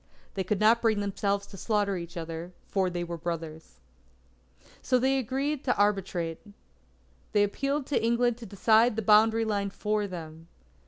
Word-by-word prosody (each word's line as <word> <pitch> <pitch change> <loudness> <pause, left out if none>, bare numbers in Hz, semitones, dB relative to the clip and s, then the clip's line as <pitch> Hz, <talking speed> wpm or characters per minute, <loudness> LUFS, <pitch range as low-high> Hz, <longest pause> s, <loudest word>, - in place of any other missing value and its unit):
They 190 - -2
could 190 +2 -1
not 225 +2 +4
bring 220 -3 +2
themselves 200 0 -1
to 200 - -12
slaughter 205 -1 0
each 170 0 -7
other, 165 +2 -6
for 190 -2 0
they 175 0 -3
were 170 -1 -6
brothers. 160 - -6 1.1
They 265 +1 +3
agreed 270 +4 -2
to 250 - +1
arbitrate. 190 -5 0 0.9
They 205 - +4
appealed 275 +7 -1
to 280 - 0
England 235 +1 +1
to 230 - -9
decide 220 +4 +3
the 225 - -2
boundary 220 +2 +5
line 200 -2 -1
for 210 +1 -1
them. 165 -3 -9
205 Hz, 155 wpm, -28 LUFS, 175-230 Hz, 1.1 s, boundary